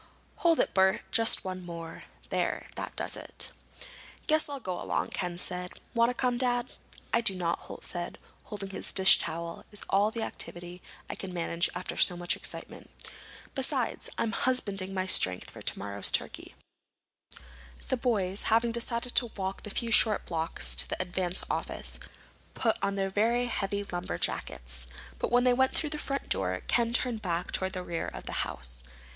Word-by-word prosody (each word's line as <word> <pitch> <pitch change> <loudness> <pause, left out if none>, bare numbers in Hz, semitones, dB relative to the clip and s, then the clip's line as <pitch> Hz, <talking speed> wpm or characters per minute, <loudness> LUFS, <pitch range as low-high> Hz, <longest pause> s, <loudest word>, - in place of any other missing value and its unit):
Hold 335 -2 +4
it, - - +2
Bert. 190 0 +4
Just 225 -3 +4
one 185 -1 -4
more. 170 -1 -7 0.2
There, - - -1
that - - -5
does - - -1
it." - - 0 0.7
"Guess 310 -1 +3
I'll 285 -1 -4
go 185 -7 -4
along," - - 0
Ken 175 -1 -2
said. 180 0 -2 0.2
"Want 235 0 +4
to 250 - -2
come, 245 -1 +1
Dad?" 245 -1 +1 0.4
"I 235 - +5
do 200 -5 +2
not," 170 -2 0
Holt - - -7
said. 175 -1 -3 0.3
"Holding 205 -2 -5
this 195 - -1
dish 190 0 +7
towel 170 +1 -4
is 210 - -6
all 200 +2 +5
the 225 0 -3
activity 175 -2 -5 0.3
I - - -4
can 190 - -6
manage 170 0 +1
after 180 - -4
so 175 - +5
much 175 0 0
excitement. - - -5 0.6
Besides, 265 -3 0
I'm 225 - +1
husbanding 200 -7 0
my 185 -1 -1
strength 95 - +3
for - - -10
tomorrow's 100 0 -1
turkey." - - -2 1.3
The - - +3
boys, 205 -6 +1
having 230 +1 +4
decided 235 +1 -2
to 240 - +5
walk 190 0 -2
the - - -7
few 230 +3 -1
short 215 -2 +5
blocks 165 -1 -1
to - - +7
the - - -2
Advance 185 0 -1
office, - - -3 0.6
put 225 -3 +2
on 200 0 +1
their 195 -1 0 0.3
heavy 200 -3 -1
lumberjackets. 65 - -3 0.3
But - - -1
when 245 0 +5
they 250 -1 +5
went 260 +1 +3
through 305 -2 0
the 300 - -2
front 275 -1 -2
door 90 -1 0
Ken 235 -1 +2
turned 240 -2 +1
back 175 -3 -1
toward 190 0 -1
the 185 -1 -3
rear 170 -2 -3
of - - -7
the - - -5
house. - - -4
195 Hz, 175 wpm, -30 LUFS, 175-235 Hz, 1.3 s, dish